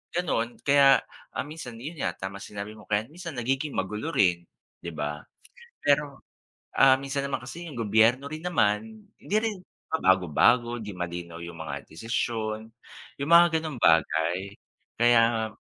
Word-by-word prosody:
ganun 120 Hz, -9 st, -1 dB
kaya 140 Hz, -1 st, +5 dB, 0.4 s
minsan 150 Hz, -4 st, -8 dB
yun 145 Hz, +8 st, -8 dB
nga, 90 Hz, -7 st, -1 dB
tama 95 Hz, +1 st, -6 dB
sinabi 100 Hz, +1 st, -7 dB
mo 110 Hz, -1 st, -14 dB
kaya 105 Hz, +1 st, +1 dB
minsan 170 Hz, -2 st, -8 dB
nagiging 135 Hz, +4 st, -2 dB
magulo 105 Hz, +12 st, -3 dB
rin, 90 Hz, -5 st, +3 dB, 0.3 s
'di 85 Hz, -, -7 dB
ba? 75 Hz, 0 st, -4 dB, 0.6 s
Pero, 145 Hz, -1 st, +1 dB, 0.6 s
ah, 130 Hz, 0 st, +6 dB
minsan 140 Hz, 0 st, -2 dB
naman 140 Hz, -, -3 dB
kasi 165 Hz, +8 st, -8 dB
yung 140 Hz, -7 st, -8 dB
gobyerno 115 Hz, +5 st, +3 dB
rin 155 Hz, +2 st, -7 dB
naman, 110 Hz, -9 st, 0 dB
hindi 205 Hz, -, -4 dB
rin 220 Hz, -2 st, -1 dB, 0.4 s
pabago-bago, 105 Hz, -, +3 dB
hindi 105 Hz, -, -7 dB
malinaw 85 Hz, -1 st, -5 dB
yung 85 Hz, -1 st, -8 dB
mga 70 Hz, -3 st, -6 dB
desisyon, 110 Hz, +3 st, -3 dB, 0.6 s
yung 140 Hz, -, -2 dB
mga 170 Hz, -1 st, +7 dB
ganong 155 Hz, -5 st, -5 dB
bagay 85 Hz, +4 st, +2 dB, 0.4 s
kaya 115 Hz, -1 st, +4 dB
115 Hz, 140 wpm, -27 LUFS, 95-140 Hz, 0.6 s, mga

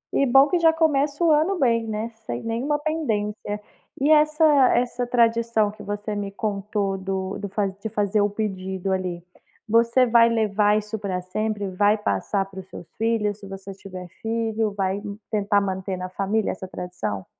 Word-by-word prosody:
E 275 Hz, -, +3 dB
bom 270 Hz, +3 st, +6 dB
que 355 Hz, +2 st, +1 dB
já 325 Hz, -1 st, +6 dB
começa 300 Hz, -1 st, +1 dB
o 325 Hz, -, +5 dB
ano 320 Hz, +6 st, +3 dB
bem, 230 Hz, -6 st, +2 dB
né, 220 Hz, +1 st, -3 dB, 0.2 s
sem 120 Hz, -, -4 dB
nenhuma 245 Hz, +6 st, -1 dB
pendência. 215 Hz, -9 st, -2 dB, 0.4 s
E 285 Hz, +3 st, +3 dB
essa 305 Hz, +1 st, +4 dB, 0.3 s
essa 245 Hz, 0 st, -1 dB
tradição 230 Hz, -3 st, +2 dB
que 210 Hz, -, -13 dB
você 205 Hz, +1 st, -4 dB
me 200 Hz, -1 st, -3 dB
contou 200 Hz, -1 st, -2 dB
do 190 Hz, 0 st, -3 dB
do 200 Hz, 0 st, -5 dB
fa 200 Hz, +1 st, 0 dB
de 200 Hz, +3 st, -6 dB
fazer 205 Hz, 0 st, +1 dB
o 205 Hz, -, +2 dB
pedido 190 Hz, -2 st, -3 dB
ali, 180 Hz, -2 st, -2 dB, 0.4 s
você 235 Hz, +3 st, +4 dB
vai 230 Hz, -1 st, +5 dB
levar 210 Hz, -2 st, +2 dB
isso 215 Hz, +1 st, -4 dB
para 195 Hz, -3 st, -2 dB
sempre? 205 Hz, +2 st, -2 dB
Vai 205 Hz, +3 st, +3 dB
passar 205 Hz, -2 st, -1 dB
para 190 Hz, -1 st, -10 dB
os 190 Hz, -, -10 dB
seus 175 Hz, -, -10 dB
filhos, 220 Hz, -2 st, 0 dB
se 200 Hz, -, -10 dB
você 195 Hz, 0 st, -8 dB
tiver 185 Hz, -2 st, -9 dB
filho? 225 Hz, -1 st, -1 dB
Vai, 190 Hz, 0 st, 0 dB
ih, 205 Hz, 0 st, -7 dB
tentar 205 Hz, -1 st, +2 dB
manter 190 Hz, -1 st, -3 dB
na 185 Hz, 0 st, -5 dB
família 200 Hz, +3 st, 0 dB
essa 190 Hz, 0 st, -7 dB
tradição? 180 Hz, -, -5 dB
210 Hz, 180 wpm, -24 LUFS, 195-230 Hz, 0.4 s, bom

